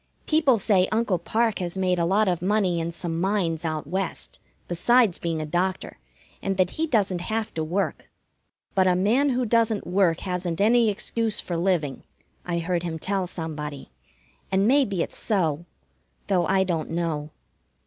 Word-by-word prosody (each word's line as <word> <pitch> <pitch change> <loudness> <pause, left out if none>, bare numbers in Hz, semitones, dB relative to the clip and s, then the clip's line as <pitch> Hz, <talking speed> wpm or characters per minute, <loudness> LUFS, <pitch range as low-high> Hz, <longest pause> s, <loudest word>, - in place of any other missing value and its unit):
People 305 -6 +3
say 190 -3 +3
Uncle 215 -5 +1
Parke 225 +5 0
has 180 0 -3
made 180 -2 +1
a 170 - +2
lot 200 +4 +2
of 175 -3 0
money 190 -2 +1
in 165 +1 -2
some 170 -1 -4
mines 180 -4 0
out 155 -2 -2
West, 190 0 -3 0.3
besides 215 +3 +3
being 165 -2 -2
a 155 - -3
doctor, 180 +4 -2 0.4
and 195 -1 -2
that 185 -1 +2
he 320 +1 -2
doesn't 200 - +1
have 220 +4 -2
to 160 - -2
work. 180 +6 -2 0.6
"But 190 -1 +3
a 180 - +4
man 230 +10 +2
who 250 -1 0
doesn't 225 -2 +1
work 180 -2 +2
hasn't 180 -3 -3
any 230 +2 +4
excuse 220 +2 0
for 175 - -3
living," 165 -5 0 0.5
I 175 -1 -1
heard 170 +1 -1
him 165 -2 -4
tell 190 +2 -1
somebody, 150 - -6 0.6
and 195 +2 +3
maybe 240 -10 +3
it's - - -5
so, 170 -7 0 0.6
though 180 -4 +1
I 190 0 +3
don't 165 -5 -2
know. 160 -3 -2
185 Hz, 170 wpm, -25 LUFS, 170-210 Hz, 0.6 s, a